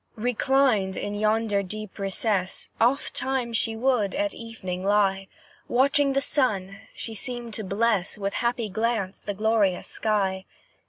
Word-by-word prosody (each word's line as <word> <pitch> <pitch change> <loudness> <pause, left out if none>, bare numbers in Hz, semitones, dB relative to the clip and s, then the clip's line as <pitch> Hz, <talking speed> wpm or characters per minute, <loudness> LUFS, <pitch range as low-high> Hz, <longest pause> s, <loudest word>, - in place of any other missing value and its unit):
Reclined 245 -3 +2
in 205 - -3
yonder 215 0 +1
deep 210 +1 -7
recess, 195 -1 -1
Ofttimes 255 -1 +1
she 225 0 +1
would, 230 -3 +1
at 305 +1 0
evening, 190 -6 -6
lie 195 -1 +2 0.4
Watching 275 +2 +3
the 275 - +2
sun; 200 -9 0 0.2
she 225 - -5
seemed 240 +1 -4
to 215 - -2
bless 205 -1 0
With 200 -1 -2
happy 235 -1 0
glance 220 -2 -1
the 205 - -5
glorious 210 -3 +2
sky. 195 -3 0
215 Hz, 130 wpm, -26 LUFS, 195-240 Hz, 0.4 s, Watching